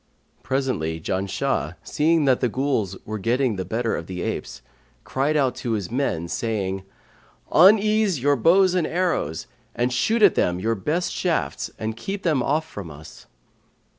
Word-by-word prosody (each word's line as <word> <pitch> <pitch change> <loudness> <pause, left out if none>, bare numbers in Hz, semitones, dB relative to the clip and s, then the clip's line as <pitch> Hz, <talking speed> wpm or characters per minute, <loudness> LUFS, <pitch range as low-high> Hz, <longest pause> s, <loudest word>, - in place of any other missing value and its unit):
Presently, 125 - -1
Janshah, 95 +3 -2
seeing 160 0 +2
that 130 -2 +3
the 125 - +1
Ghuls 115 -7 -1
were 110 0 -4
getting 120 +2 +1
the 95 - -3
better 115 +4 -1
of - - -6
the 90 -1 -5
apes, - - -5 0.4
cried 145 +3 0
out 135 -4 +2
to 120 -3 -2
his 100 -4 -3
men, 120 - -1
saying, 95 -2 -2 0.7
'Unease 210 0 +5
your 145 +3 +3
bows 180 +8 +4
and 180 -3 +1
arrows 170 - -1 0.3
and 120 +1 0
shoot 220 - +1
at 200 - +7
them 90 0 +1
your 115 +5 0
best 150 - -1
shafts - - -1
and 110 0 -3
keep 195 - -5
them 155 -7 +2
off 155 +5 0
from 100 - -8
us.' 75 +1 -13
125 Hz, 160 wpm, -23 LUFS, 100-160 Hz, 0.7 s, at